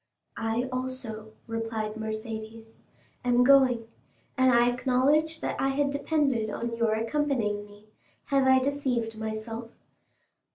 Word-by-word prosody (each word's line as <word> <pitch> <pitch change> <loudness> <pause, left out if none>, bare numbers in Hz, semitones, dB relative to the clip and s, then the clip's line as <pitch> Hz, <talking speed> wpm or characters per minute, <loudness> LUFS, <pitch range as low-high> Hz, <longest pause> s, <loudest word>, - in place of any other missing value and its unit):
"I 230 +2 -1
also," 255 -4 -5
replied 225 -1 -3
Mercédès, 220 0 -6 0.4
"am 245 0 +4
going, 255 -4 +5 0.5
and 260 -1 +4
I 240 0 +5
acknowledge 275 +6 +2
I 270 - -1
had 280 +1 +1
depended 280 -6 0
on 230 +2 -3
your 230 -2 +1
accompanying 225 -3 0
me; 205 +1 -17 0.4
have 275 -1 +3
I 260 0 +6
deceived 255 -5 -1
myself?" 220 +1 -5
235 Hz, 115 wpm, -28 LUFS, 220-265 Hz, 0.5 s, I